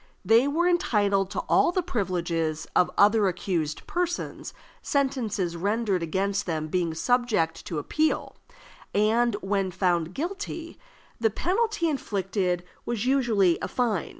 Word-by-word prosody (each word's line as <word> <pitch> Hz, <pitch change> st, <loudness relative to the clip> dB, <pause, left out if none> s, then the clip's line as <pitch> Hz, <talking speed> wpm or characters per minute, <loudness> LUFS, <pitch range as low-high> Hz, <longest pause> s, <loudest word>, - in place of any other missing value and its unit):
They 230 Hz, +4 st, +5 dB
were 330 Hz, +5 st, +1 dB
entitled 205 Hz, -, +2 dB
to -, -, -2 dB
all -, -, +3 dB
the 365 Hz, 0 st, 0 dB
privileges 175 Hz, -, -1 dB
of 180 Hz, -, +4 dB
other 205 Hz, 0 st, +5 dB
accused 175 Hz, -4 st, -2 dB
persons, 350 Hz, 0 st, -3 dB, 0.3 s
sentences 225 Hz, -11 st, -1 dB
rendered 200 Hz, +1 st, 0 dB
against 195 Hz, +5 st, -1 dB
them 155 Hz, -2 st, -2 dB
being 170 Hz, -2 st, -1 dB
subject 225 Hz, -4 st, +1 dB
to 165 Hz, -, -3 dB
appeal; 310 Hz, -, -1 dB, 0.6 s
and, 225 Hz, +2 st, +3 dB
when 195 Hz, -1 st, 0 dB
found 175 Hz, -2 st, 0 dB
guilty, 335 Hz, 0 st, -5 dB, 0.4 s
the 225 Hz, -1 st, +3 dB
penalty 380 Hz, -, 0 dB
inflicted 195 Hz, -, -1 dB, 0.2 s
was 235 Hz, -1 st, -2 dB
usually 230 Hz, -10 st, +3 dB
a -, -, -2 dB
fine. 225 Hz, -9 st, -1 dB
205 Hz, 125 wpm, -26 LUFS, 180-260 Hz, 0.6 s, They